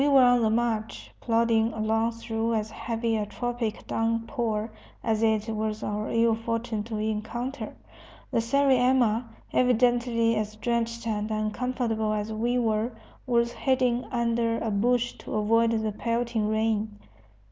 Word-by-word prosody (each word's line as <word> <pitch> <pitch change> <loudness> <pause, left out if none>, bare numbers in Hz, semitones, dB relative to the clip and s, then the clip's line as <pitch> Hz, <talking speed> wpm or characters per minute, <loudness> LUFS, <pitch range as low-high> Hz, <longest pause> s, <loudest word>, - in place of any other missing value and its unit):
We 285 - +3
were 275 -2 +6
on 245 -1 +5
the 220 - +3
march, 225 -1 -1
plodding 230 -1 +2
along 225 +1 0
through 225 0 -2
as 215 0 -2
heavy 230 0 -1
a 210 -1 -2
tropic 240 0 -3
downpour 230 -1 -1 0.3
as 220 -2 +1
it 220 -1 +2
was 215 0 -2
our 210 +1 -2
ill 230 0 +3
fortune 230 -1 -2
to 225 -2 -4
encounter. 220 +5 -3 0.6
The - - +2
sariema, 250 -2 +3 0.3
evidently 240 -2 +3
as 215 0 -2
drenched 235 +1 -2
and 215 -1 -1
uncomfortable 220 0 -1
as 210 +1 -2
we 240 +3 0
were, 225 0 0 0.3
was 235 -1 +2
hiding 255 -2 +1
under 235 -1 0
a 225 - -2
bush 240 +4 +1
to - - -6
avoid 225 +2 +3
the 220 -1 0
pelting 230 0 -1
rain. 220 -1 0
230 Hz, 140 wpm, -27 LUFS, 220-240 Hz, 0.6 s, were